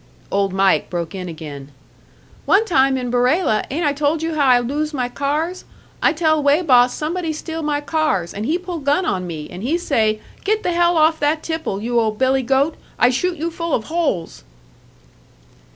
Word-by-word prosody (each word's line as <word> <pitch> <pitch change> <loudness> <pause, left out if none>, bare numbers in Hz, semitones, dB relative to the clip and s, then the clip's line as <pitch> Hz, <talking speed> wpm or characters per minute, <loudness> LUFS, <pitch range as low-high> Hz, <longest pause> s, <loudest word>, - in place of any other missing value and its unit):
Old 195 -1 +1
Mike 195 0 +2
broke 170 0 -4
in 185 -2 -5
again. 145 -4 -8 0.8
"One 415 +3 +4
time 270 -8 +3
in 250 -2 -3
Barela 250 - +2
ain't 315 +5 -1
I 290 - +2
told 300 +2 0
you 325 0 -1
how 290 -3 +2
I 250 -1 +6
lose 290 +5 -2
my 250 -2 -1
cars? 300 +8 -2 0.4
I - - +4
tell 315 -1 +1
weigh 290 +4 +3
boss 250 -5 +4
somebody 330 +2 -2
steal 320 +1 -5
my 295 -1 -1
cars, 295 - -1
and 210 +3 -4
he 325 - +1
pull 360 -2 -6
gun 290 +6 +1
on 185 - -1
me, 155 -3 -6
and 180 - -8
he 285 +10 0
say, 220 -10 +1 0.2
'Get 430 +1 0
the 355 - 0
hell 345 0 +2
off 315 +1 +3
that 300 +2 0
tipple, 320 -12 -3
you 240 +1 +1
old 215 -2 0
billy 265 +2 +2
goat, 270 +5 +1 0.2
I 245 - +4
shoot 350 +7 -1
you 330 +3 -3
full 335 -2 -2
of 220 - -2
holes!'" 290 - -1
285 Hz, 195 wpm, -20 LUFS, 235-325 Hz, 0.8 s, I